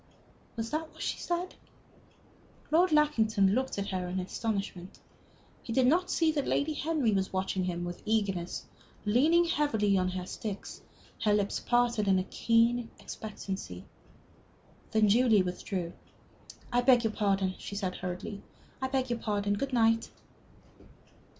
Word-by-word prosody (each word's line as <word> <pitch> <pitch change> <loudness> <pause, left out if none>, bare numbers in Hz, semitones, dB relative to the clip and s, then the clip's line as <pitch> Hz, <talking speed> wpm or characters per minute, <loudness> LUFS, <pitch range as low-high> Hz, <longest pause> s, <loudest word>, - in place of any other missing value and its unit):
Was 225 0 -4
that 315 +1 -3
what - - -8
she - - -2
said? 350 +1 -2 1.2
Lord 350 +3 +4
Lackington 220 -10 +3
looked 260 0 -1
at 200 0 -2
her 185 -2 -2
in 185 +1 -2
astonishment. 195 -2 -4 0.6
He - - -7
did 260 0 +4
not 350 +7 +3
see 325 -2 +2
that 290 -3 -1
Lady 305 +2 +1
Henry 300 -6 0
was 190 -2 0
watching 190 -1 -1
them 175 -1 -2
with 175 0 -6
eagerness, 200 -5 -1 0.4
leaning 305 +11 +4
heavily 225 - +2
on 185 - +1
her 185 0 -4
sticks, 205 +1 -6 0.4
her 210 -1 +4
lips 205 -1 0
parted 240 -3 +1
in 190 -1 +4
a 185 - +1
keen 230 +3 +2
expectancy. 195 - -6 1.0
Then 220 -1 +3
Julie 220 -2 +5
withdrew. 180 -1 -4 0.8
"I 245 - +4
beg 245 -1 +5
your 220 -1 0
pardon," 195 -3 +1
she 200 - -7
said, 190 -3 -2
hurriedly. 180 +3 -5 0.4
"I 260 - 0
beg 260 -1 -1
your 235 - -1
pardon. 205 -2 0
Good 275 +7 -2
night." 225 -2 +3
220 Hz, 145 wpm, -30 LUFS, 195-255 Hz, 1.2 s, Julie